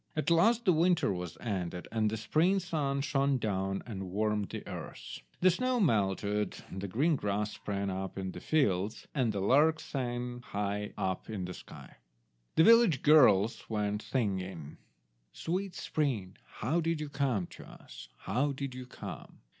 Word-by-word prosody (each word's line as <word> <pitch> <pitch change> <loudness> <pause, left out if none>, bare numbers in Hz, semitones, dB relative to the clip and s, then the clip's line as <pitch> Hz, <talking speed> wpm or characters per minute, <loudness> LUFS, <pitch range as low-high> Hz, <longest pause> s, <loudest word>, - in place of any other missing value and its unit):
At 155 +2 0
last 225 +8 +4
the 185 - +5
winter 165 - +3
was 90 -3 -6
ended, 90 -5 -3
and 110 -1 +1
the 110 - -3
spring 165 - +2
sun 150 -7 -1
shone 140 -1 +1
down 95 -4 -2
and 95 -5 -6
warmed 105 +1 0
the - - -6
earth. - - -7 0.2
The 185 +1 +6
snow 255 +6 0
melted, 105 - +1 0.2
the 95 +1 -4
green 145 - +2
grass 105 -3 -1
sprang 100 -1 -3
up 95 +1 -4
in 95 -1 -3
the - - -8
fields, 105 - 0
and 125 -6 +1
the 100 -2 -2
lark 150 +9 +4
sang 125 -2 -4
high 105 -1 -3
up 95 +2 -2
in 100 -4 -3
the 90 - -6
sky. - - -12 0.6
The 160 - +6
village 230 - +6
girls 125 -8 +5
went 105 -1 -1
singing— 95 - -3 0.5
"Sweet 185 +2 -3
spring, 115 -12 -2
how 155 +10 -1
did 165 -1 0
you 150 - -3
come 135 -9 0
to - - -11
us? - - -12
How 135 +8 0
did 140 -1 -5
you 130 0 -8
come? - - -9
120 Hz, 160 wpm, -31 LUFS, 100-155 Hz, 0.6 s, The